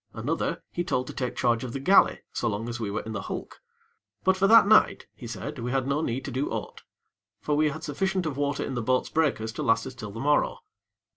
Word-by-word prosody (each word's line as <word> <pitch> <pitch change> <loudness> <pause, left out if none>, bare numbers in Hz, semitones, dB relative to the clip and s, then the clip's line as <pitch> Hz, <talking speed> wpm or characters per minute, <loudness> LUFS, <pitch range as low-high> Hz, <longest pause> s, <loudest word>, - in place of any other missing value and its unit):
Another, 155 +8 -2
he 175 - -2
told 130 -8 -1
to - - -8
take 125 -2 -3
charge 120 -1 +1
of 125 -2 -5
the 135 - -3
galley, 190 +9 +4
so 120 - -1
long 110 +2 -3
as 120 0 -4
we 110 -3 -2
were 105 - -2
in 110 - -6
the 105 - -3
hulk. - - -7 0.6
But 190 0 +4
for 190 +1 +3
that 230 +1 +8
night, 215 +1 +4
he 120 - -10
said 130 +5 -6
we 120 +1 -3
had 130 0 0
no 140 +2 +1
need 130 -2 -2
to - - -5
do 130 +3 -1
aught; - - -5 0.6
for 150 - -1
we 155 +1 +3
had 155 +2 -7
sufficient 185 +4 -1
of 155 -4 -2
water 145 0 -1
in - - -4
the 120 - -2
boats' 130 +3 +1
breakers 140 -9 +1
to - - -5
last 115 - +2
us 130 - -6
till 125 -5 -8
the 110 +3 -8
morrow. 145 +3 +2
135 Hz, 245 wpm, -27 LUFS, 120-155 Hz, 0.6 s, that